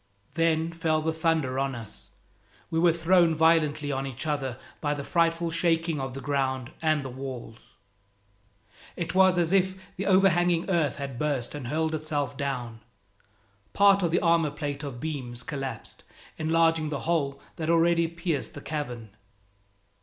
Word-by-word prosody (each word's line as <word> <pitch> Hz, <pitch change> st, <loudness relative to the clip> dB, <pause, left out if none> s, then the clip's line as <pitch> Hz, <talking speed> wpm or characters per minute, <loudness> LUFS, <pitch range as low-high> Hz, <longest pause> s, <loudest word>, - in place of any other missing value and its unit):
Then 165 Hz, 0 st, +1 dB
fell 160 Hz, -2 st, 0 dB
the 160 Hz, 0 st, 0 dB
thunder 160 Hz, -5 st, 0 dB
on 135 Hz, -1 st, -1 dB
us! 110 Hz, -3 st, -11 dB, 0.6 s
We 160 Hz, -, +1 dB
were 170 Hz, 0 st, +5 dB
thrown 170 Hz, 0 st, +3 dB
violently 155 Hz, -2 st, +3 dB
on 135 Hz, 0 st, -2 dB
each 135 Hz, +1 st, -5 dB
other 135 Hz, -5 st, -2 dB, 0.2 s
by 150 Hz, -1 st, -1 dB
the 140 Hz, -, -5 dB
frightful 165 Hz, +1 st, +1 dB
shaking 165 Hz, -2 st, +1 dB
of 135 Hz, -1 st, -5 dB
the 135 Hz, -, -6 dB
ground 130 Hz, -3 st, -1 dB
and 155 Hz, -3 st, +1 dB
the -, -, -4 dB
walls. 125 Hz, -4 st, -7 dB, 1.4 s
It 170 Hz, -, -3 dB
was 190 Hz, -1 st, +5 dB
as 170 Hz, +1 st, +2 dB
if 190 Hz, -1 st, +3 dB, 0.2 s
the 195 Hz, -, -2 dB
overhanging 175 Hz, -3 st, +3 dB
earth 160 Hz, -6 st, +1 dB
had 135 Hz, -4 st, -5 dB
burst 140 Hz, -5 st, -1 dB
and 145 Hz, -5 st, -6 dB
hurled 160 Hz, +3 st, 0 dB
itself 150 Hz, -4 st, -2 dB
down. 125 Hz, -5 st, -4 dB, 0.9 s
Part 200 Hz, -1 st, +5 dB
of 170 Hz, -, +1 dB
the 165 Hz, -, +1 dB
armor 165 Hz, -3 st, +3 dB
plate 145 Hz, 0 st, -4 dB
of 140 Hz, -5 st, -6 dB
beams 130 Hz, -5 st, -5 dB
collapsed, 135 Hz, -2 st, -6 dB, 0.4 s
enlarging 165 Hz, 0 st, +2 dB
the 145 Hz, -2 st, -3 dB
hole 145 Hz, -5 st, 0 dB, 0.2 s
that 160 Hz, -1 st, -3 dB
already 170 Hz, 0 st, +3 dB
pierced 170 Hz, -3 st, -3 dB
the 145 Hz, -, -7 dB
cavern. 125 Hz, -9 st, -5 dB
155 Hz, 155 wpm, -27 LUFS, 135-165 Hz, 1.4 s, were